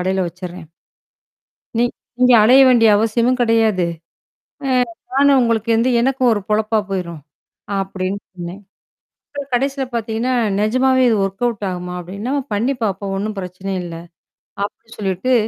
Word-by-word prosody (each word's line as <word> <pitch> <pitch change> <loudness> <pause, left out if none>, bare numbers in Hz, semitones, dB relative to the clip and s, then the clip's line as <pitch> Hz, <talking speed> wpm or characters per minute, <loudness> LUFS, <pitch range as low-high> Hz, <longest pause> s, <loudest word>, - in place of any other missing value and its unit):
கடையில 190 0 0
வச்சிர்றேன். 180 -1 -9 1.1
நீங்க 240 0 +2 0.3
இங்க 250 0 +6
அலைய 255 +5 +7
வேண்டிய 235 -3 +5
அவசியமும் 235 +4 +1
கிடையாது. 225 -6 +2 0.8
ஆ, - - -1 0.4
நானு 280 +2 +4
உங்களுக்கு 230 -1 0
வந்து, 230 +3 +2
எனக்கும் 260 0 +2
ஒரு 205 - -2
பொழப்பா 215 +1 +1
போயிரும் 170 -5 -4 0.6
அப்படின்னு 195 0 -3
சொன்னேன் 180 +2 -8 0.9
கடைசில 270 +2 0
பாத்தீங்கன்னா, 230 +2 -1 0.3
நெஜமாவே 255 +4 +3
இது 225 - +3
வொர்க்அவுட் 205 +2 -2
ஆகுமா? 180 0 -5
அப்படின்னு. 180 +3 -8
என்னம்மா, 275 +4 -1
பண்ணி 235 +7 +1
பாப்போம். 195 -1 -2
ஒண்ணும் 210 +1 -3
பிரச்சனை 185 +1 -6
இல்ல. 170 -1 -7 0.7
அப்படி 220 +2 -7
சொல்லிட்டு 195 +5 0
215 Hz, 130 wpm, -19 LUFS, 190-245 Hz, 1.1 s, அலைய